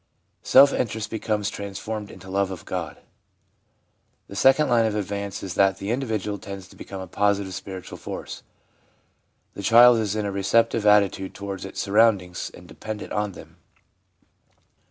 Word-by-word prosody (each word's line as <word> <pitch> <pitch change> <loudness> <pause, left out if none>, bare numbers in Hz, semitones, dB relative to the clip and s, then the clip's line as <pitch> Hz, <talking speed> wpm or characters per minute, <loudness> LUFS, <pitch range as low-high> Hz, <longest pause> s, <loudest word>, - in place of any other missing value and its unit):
Self 140 +2 +6
interest 110 -2 -2
becomes 105 -2 -1
trans 100 -1 -6
formed 110 -2 -5
into 95 0 -13
love 95 0 0
of 95 -2 -8
God. - - -4 1.3
The 100 - -11
second 135 +7 +4
line 115 -2 +3
of 105 - -2
advance 100 0 -4
is 95 -2 -4
that 95 0 +3
the 100 +3 -4
individual 110 -5 -2
tends 95 -1 -8
to - - -17
become 95 - -8
a - - -6
positive, 100 +1 0
spiritual 95 0 -8
force. - - -7 1.1
The - - -7
child 120 +3 +7
is 105 -2 -1
in 105 -1 -1
a 100 - -2
receptive 105 +3 +2
attitude 100 -2 +3
towards 100 -1 -6
its 95 - -7
surroundings 100 -4 +2
and - - -14
dependent 110 -1 -7
on 105 -2 -1
them. - - -14
100 Hz, 155 wpm, -24 LUFS, 95-110 Hz, 1.3 s, child